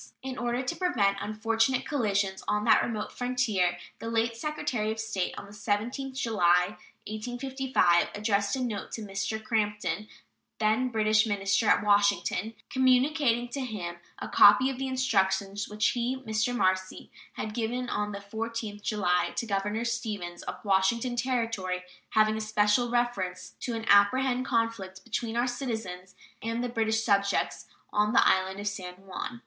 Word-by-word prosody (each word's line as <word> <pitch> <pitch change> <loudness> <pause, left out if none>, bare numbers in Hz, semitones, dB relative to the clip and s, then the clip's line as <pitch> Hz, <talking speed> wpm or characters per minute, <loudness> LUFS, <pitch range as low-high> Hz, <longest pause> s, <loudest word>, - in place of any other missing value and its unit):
In 260 -1 -4
order 240 +1 -1
to 255 - -2
prevent 205 - +1
unfortunate 225 +4 0
collisions 200 -8 0
on 210 0 +1
that 220 -2 +6
remote 215 -3 -3
frontier, 225 -8 0 0.2
the 230 - -5
late 230 0 0
Secretary 250 -5 -2
of 220 - -5
State, 220 -5 -2
on - - -7
the 200 - -14
17th 230 +6 -2
July, 180 -6 +2 0.3
1855, 245 -4 +1
addressed 205 +1 +1
a 260 - -3
note 215 -5 -4
to 225 - -4
Mr. 205 +2 -3
Crampton, 210 -1 -1 0.5
then 220 +4 +2
British 215 -1 +3
minister 200 +1 +1
at - - +4
Washington, 205 +1 +2 0.2
communicating 255 -1 +3
to 275 - -4
him 195 -9 -5 0.2
a - - -5
copy 210 +6 +6
of 260 - -7
the 270 - -2
instructions 200 -6 0
which 210 0 +1
he 245 +2 -1
(Mr. 220 +1 0
Marcy) 185 -1 0 0.2
had 215 - -5
given 240 +2 -2
on 210 -2 -2
the 200 - -5
14th 220 +1 -5
July 185 -5 +1
to - - -1
Governor 205 +2 -1
Stevens, 210 -7 -3
of - - -5
Washington 210 +6 +2
Territory, 225 -7 -1 0.3
having 215 0 +3
a 220 - -3
special 215 +3 +2
reference 190 -7 -1
to 240 - -3
an 225 0 -4
"apprehended 255 +6 +4
conflict 230 -6 -1
between 235 +1 -3
our 240 - +3
citizens 220 -8 -4 0.3
and 230 +2 -2
the 245 - -2
British 220 -1 0
subjects 200 -2 +1 0.3
on 210 +1 +2
the - - +5
island 190 +1 +2
of 205 - -4
San 185 -3 -4
Juan." 195 +5 -7
220 Hz, 155 wpm, -28 LUFS, 200-240 Hz, 0.5 s, that